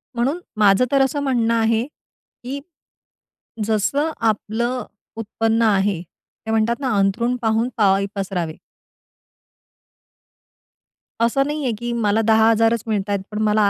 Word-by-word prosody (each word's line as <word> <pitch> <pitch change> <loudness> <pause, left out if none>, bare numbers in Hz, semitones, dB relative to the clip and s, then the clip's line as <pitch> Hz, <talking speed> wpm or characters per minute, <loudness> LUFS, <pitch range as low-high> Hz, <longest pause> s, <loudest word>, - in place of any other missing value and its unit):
म्हणून 265 +8 0 0.2
माझं 205 +3 +5
तर 275 -1 +4
असं 270 +2 +1
म्हणणं 235 -4 +1
आहे, 225 0 +2
की 275 -2 -11 1.1
जसं 250 +9 0
आपलं 230 +3 -1 0.3
उत्पन्न 225 +1 0
आहे. 200 -4 +2
ते 200 +5 -12
म्हणतात 225 +1 +2
ना, 270 -2 -2
"अंथरूण 230 +5 +1
पाहून 225 +1 +1
पाय 200 -2 +3
पसरावे." 180 -5 -3 2.6
असं 235 +4 +3
नाही 300 0 -3
आहे, 255 - 0
की 240 0 -3
मला 220 -2 +1
10,000च 225 +1 +4
मिळतायत, 205 -2 -1
पण 210 - -4
मला 210 -1 +3
225 Hz, 120 wpm, -21 LUFS, 210-240 Hz, 2.6 s, माझं